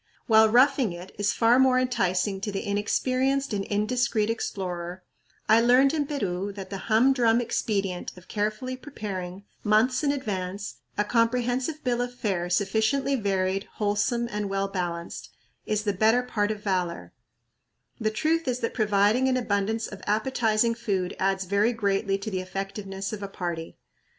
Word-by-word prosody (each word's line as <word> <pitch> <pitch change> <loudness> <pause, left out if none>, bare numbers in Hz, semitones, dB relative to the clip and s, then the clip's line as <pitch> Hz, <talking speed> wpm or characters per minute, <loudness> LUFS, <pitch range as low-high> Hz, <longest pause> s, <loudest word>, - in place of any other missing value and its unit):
While 220 -1 +6
"roughing 250 -3 +4
it" 175 +2 -10
is 205 0 +2
far 235 +2 +4
more 260 -1 +5
enticing 195 -5 0
to 205 - -3
the 195 - -4
inexperienced 255 +6 0
and 200 -1 -1
indiscreet 220 +1 0
explorer, 180 -4 -4 0.4
I 220 +1 +6
learned 255 +4 +5
in 295 -3 0
Peru 200 -9 -2
that 195 -1 -8
the 195 - -6
humdrum 235 0 +4
expedient 200 -6 -2
of 180 - -15
carefully 215 +5 -2
preparing, 200 -8 -6 0.2
months 230 +6 +3
in 285 - +3
advance, 200 -7 -4 0.2
a 210 - +3
comprehensive 245 +6 0
bill 245 -2 0
of 245 0 -4
fare 190 -7 -2
sufficiently 220 +9 +1
varied, 195 -3 0
wholesome, 215 +3 0
and 210 -1 -2
well 195 0 0
balanced, 175 -3 -4 0.4
is 215 -1 0
"the 205 -2 0
better 220 +5 +3
part 210 -4 -1
of 210 -1 -4
valor," 180 -4 -2 0.9
The 220 -2 +1
truth 315 +9 0
is 250 -1 +1
that 230 - -1
providing 210 +3 +3
an 255 -1 +2
abundance 220 -1 0
of 205 - -9
appetizing 220 +1 +2
food 195 -6 -2
adds 195 0 +1
very 200 +5 +2
greatly 200 -2 0
to 200 +2 -6
the 185 -1 -1
effectiveness 195 +1 -5
of 210 - -5
a 200 - -4
party. 175 -4 -5
210 Hz, 155 wpm, -26 LUFS, 195-245 Hz, 0.9 s, While